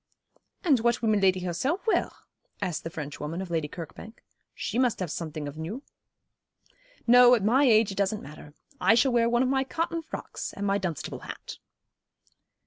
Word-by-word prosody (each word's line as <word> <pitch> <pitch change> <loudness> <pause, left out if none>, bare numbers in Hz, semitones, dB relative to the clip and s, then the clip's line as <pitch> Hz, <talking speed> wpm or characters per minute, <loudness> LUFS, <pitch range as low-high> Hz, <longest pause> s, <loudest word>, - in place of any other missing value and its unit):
'And 290 - +4
what 235 +1 +1
will 225 - +2
Miladi 195 -3 +3
herself 260 - -1
wear?' 445 - +2 0.5
asked 175 -3 -3
the 165 - -4
French 150 -3 -7
woman 155 +4 -4
of 190 -2 -6
Lady 160 -3 0
Kirkbank. 175 +8 -10 0.3
'She 230 - -2
must 250 -3 +2
have 180 -5 -3
something 155 -3 -5
of 145 +2 -8
new.' 205 - -5 1.2
'No, 245 +1 +8
at 220 - -2
my 255 +7 +4
age, 220 -4 +4
it 195 - -6
doesn't 200 +2 0
matter. 145 +1 -12 0.2
I 225 - +5
shall 260 +3 +3
wear 235 -1 +3
one 240 +1 +3
of 255 - +1
my 265 0 +2
cotton 330 +4 -2
frocks, 320 - -7
and 200 - -4
my 200 0 +1
Dunstable 175 -6 -4
hat.' - - -9
210 Hz, 180 wpm, -27 LUFS, 170-245 Hz, 1.2 s, No